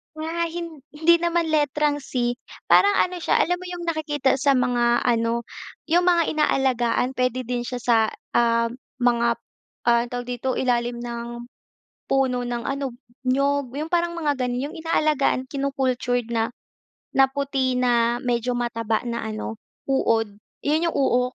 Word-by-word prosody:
Nga 325 +2 -2
hin 335 -2 -6 0.2
hindi 325 +3 +5
naman 340 -1 0
letrang 295 -1 +1
C, 245 -3 -2 0.3
parang 405 0 +6
ano 365 -1 +1
siya, - - +2
alam 355 +1 -1
mo 365 - -9
yung 355 -1 -6
nakikita 295 -4 0
sa 275 -1 +3
mga 240 -1 +2
ano, 235 0 +1 0.5
yung 350 +2 +4
mga 345 -1 +5
inaalagaan. 260 -4 +1
Puwede 255 0 0
din 245 0 -2
siya 250 - -3
sa, 235 -1 +3 0.4
ah, 230 -1 +2 0.3
mga, 235 -1 +3 0.6
ah, 235 0 +5
anong - - -12
tawag 245 0 -3
dito, 250 +1 -2
ilalim 240 -1 0
ng 235 0 -5 0.8
puno 260 -2 +2
ng 240 -1 -3
ano, 275 -2 -2 0.3
niyog, 275 0 +1
yung 315 +3 -4
parang 340 0 +1
mga 300 -3 +1
ganun, 250 +3 -2
yung 350 - -11
inaalagaan, 305 -5 +1
kinu-cultured 260 -4 -1
na 225 -1 0 0.7
na 270 - +6
puti 270 -2 -1
na 240 -1 +2
medyo 245 0 0
mataba 230 -2 -1
na 235 0 -2
ano, 220 0 -5 0.3
uod, 225 -6 +1 0.3
yun 310 +4 +2
yung - - -5
uok. 250 -2 +2
255 Hz, 150 wpm, -23 LUFS, 240-300 Hz, 0.8 s, parang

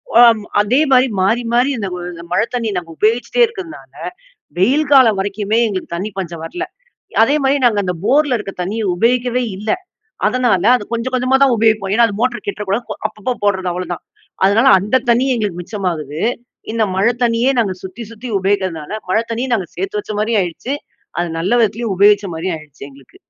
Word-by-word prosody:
வாம் 230 -3 +7 0.2
அதே 240 +7 +2
மாரி 260 0 +5
மாறி 230 +6 +2
மாறி, 245 +3 +3
இந்த 200 -3 -3
வ - - -6 0.3
மழை - - +3
தண்ணியை 225 -4 -1
நம்ப 165 - -14
உபயோகிச்சிட்டே 235 - +1
இருக்கதுனால 380 -8 -10 0.7
வெயில் 280 +10 +2
காலம் 230 -7 +6
வரைக்குமே 205 +2 -1
எங்களுக்கு 185 -3 -4
தண்ணி 205 +5 -4
பஞ்சம் 170 -3 -5
வரல. 355 - -4 0.6
அதேமாரி 275 +2 +3
நாங்க 215 -4 +2
அந்த 180 -1 -1
போர்ல 285 -1 +3
இருக்க 200 -2 -6
தண்ணிய 215 +5 -3
உபயோகிக்கவே 245 +3 +1
இல்லை. 210 +2 -1 0.5
அதனால 245 -8 +2
அது 205 - -6
கொஞ்சம் 235 +2 -2
கொஞ்சமா 255 +1 +2
தான் 265 -3 +5
உபயோகிப்போம். 215 -3 +2
ஏன்னா 235 +1 +5
அது 205 - -5
மோட்டர் 250 -1 -1
கெட்டுற 205 +1 -3
கூடாது. 220 +5 0
போ - - -2
அப்பப்போ 215 +3 -4
போடுறது 190 -3 +1
அவ்வளோதான். 180 -1 -5 0.4
அதனால 215 +6 +4
அந்த 210 +7 +1
தண்ணி 245 +3 +3
எங்களுக்கு 200 -6 -2
மிச்சமாகுது. 170 -7 -4 0.5
இந்த 225 -1 +1
மழை 225 +5 +3
தண்ணியே 235 +2 +2
நாங்க 195 -4 -1
சுத்தி 190 +5 -7
சுத்தி 230 +3 -8
உபயோகிக்கிறதுனால 190 -4 -1 0.2
மழை 220 +4 +2
தண்ணியை 245 +3 -2
நாங்க 190 -6 -2
சேர்த்து 390 +2 -3
வச்ச 215 - -7
மாரியும் 220 -1 +1
ஆயிடுச்சு. 180 - -4 0.5
அது 175 - -1
நல்ல 195 +9 +1
விதத்துலயும் 220 -1 0
உபயோகிச்ச 205 0 +4
மாரியும் 165 +1 -2
ஆயிடுச்சு 150 -2 -13
எங்களுக்கு. 135 -1 -19
215 Hz, 175 wpm, -17 LUFS, 190-245 Hz, 0.7 s, வாம்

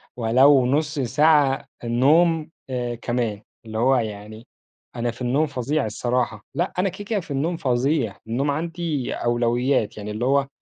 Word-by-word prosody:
ولو 130 +3 +5
1/2 150 +3 0
ساعة 145 +1 +3 0.2
النوم، 155 +7 +3 0.2
آآ، 120 -2 -2
كمان. 115 -3 -2 0.2
اللي 110 0 -6
هو 130 +3 +3
يعني، 110 0 -5 0.5
أنا 120 0 -1
في 120 +2 -15
النوم 135 +6 +2
فظيع 140 +1 -1
الصراحة. 120 0 -2
لأ، 175 +2 -1
أنا 195 - +2
كده 195 +3 -9
كده 210 -1 -1
في 165 - -10
النوم 160 +5 -1
فظيع، 125 -4 0
النوم 135 +5 0
عندي 165 -3 -3
أولويات 120 -1 0
يعني 105 0 -6
اللي 110 +3 -2
هو، 140 +1 +2
130 Hz, 155 wpm, -23 LUFS, 120-150 Hz, 0.5 s, ولو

